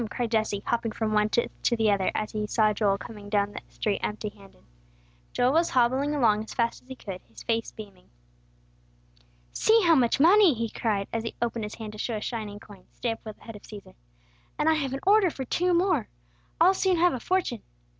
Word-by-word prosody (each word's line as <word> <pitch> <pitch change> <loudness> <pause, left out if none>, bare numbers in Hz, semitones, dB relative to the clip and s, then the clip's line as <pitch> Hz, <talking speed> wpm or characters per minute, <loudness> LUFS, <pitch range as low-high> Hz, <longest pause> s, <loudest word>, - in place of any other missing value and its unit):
cried 235 0 -3
Jesse, 215 -3 0
hopping 230 -1 -1
from 220 -1 -2
one 210 0 +3
foot 235 - 0
to 240 - +2
the 220 -2 +3
other, 195 -2 +1
as 215 - -2
he 210 -1 -3
saw 215 0 +2
Joel 200 -1 +1
coming 205 0 -10
down 205 -1 +1
the - - -7
street 205 -2 -2
empty 210 0 -3
handed. 200 -1 -19 0.7
Joel 250 +2 +2
was 330 +2 +3
hobbling 260 +4 +2
along 220 -6 +3
as 220 - -10
fast 235 -1 0
as - - -27
he 260 - -8
could, 195 -6 -8
his 115 0 -13
face 230 0 -1
beaming. 200 -4 -12 1.4
"See 445 0 +4
how 335 -2 +5
much 250 -5 +3
money!" 355 0 +6
he 230 0 -2
cried, 205 -4 -1
as 230 - 0
he 230 - -6
opened 230 -2 -2
his 210 - -7
hand 220 -2 -7
to 215 - -11
show 230 - -2
a - - -2
shining 215 -3 -5
coin, 200 -3 -15
stamped 225 -2 -3
with 215 -1 -8
the - - -21
head 225 - -9
of 205 - -11
Cæsar. 210 -2 -12 0.6
"And 300 - 0
I 320 - +5
have 280 -4 -2
an 270 - -4
order 400 -1 +5
for 270 -4 -6
two 360 +8 0
more. 345 - +2 0.5
I'll 355 +4 +6
soon 380 -2 +1
have 350 +1 +4
a 255 - -3
fortune! 335 - -1
230 Hz, 220 wpm, -27 LUFS, 210-275 Hz, 1.4 s, money